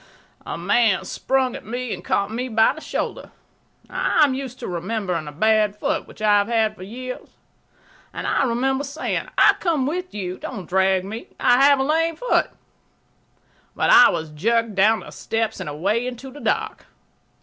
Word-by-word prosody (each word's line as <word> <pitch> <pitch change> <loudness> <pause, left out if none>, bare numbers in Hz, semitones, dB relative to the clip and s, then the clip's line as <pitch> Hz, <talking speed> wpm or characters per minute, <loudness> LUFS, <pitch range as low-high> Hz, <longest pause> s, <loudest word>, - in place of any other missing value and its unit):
A - - -4
man 225 -5 +2
sprang 265 -2 0
at - - -8
me 245 +1 -4
and 180 - -8
caught 200 +1 0
me 245 +3 -3
by 225 0 +3
the 315 - -11
shoulder. - - -4 0.6
I 310 - +2
am 280 -3 +3
used 260 -1 -6
to 240 - -7
remembering 180 -2 -3
a - - -6
bad 215 +5 +2
foot, 210 - -2
which 215 - -11
I 205 -1 +5
have 200 - 0
had 220 -2 +1
for - - -15
years, 250 +6 -8 0.8
and - - -6
I - - +1
remember 265 +3 0
saying, 285 +3 -3
"I'll - - +7
come 320 -7 -1
with 360 +5 -3
you; 185 -2 -4
don't 195 -9 -7
drag 190 0 +2
me; 220 +4 -7
I 245 +2 +4
have 285 0 +6
a - - +2
lame 325 +3 +1
foot." - - +1 1.3
But - - +2
I 295 -1 +9
was 160 - -3
jerked 225 +8 0
down 210 +3 +3
the - - -11
steps 225 -1 -2
and 185 -5 -5
away 200 +11 -1
into 255 +2 -7
the 290 - -11
dark. - - -2
230 Hz, 185 wpm, -22 LUFS, 200-265 Hz, 1.3 s, I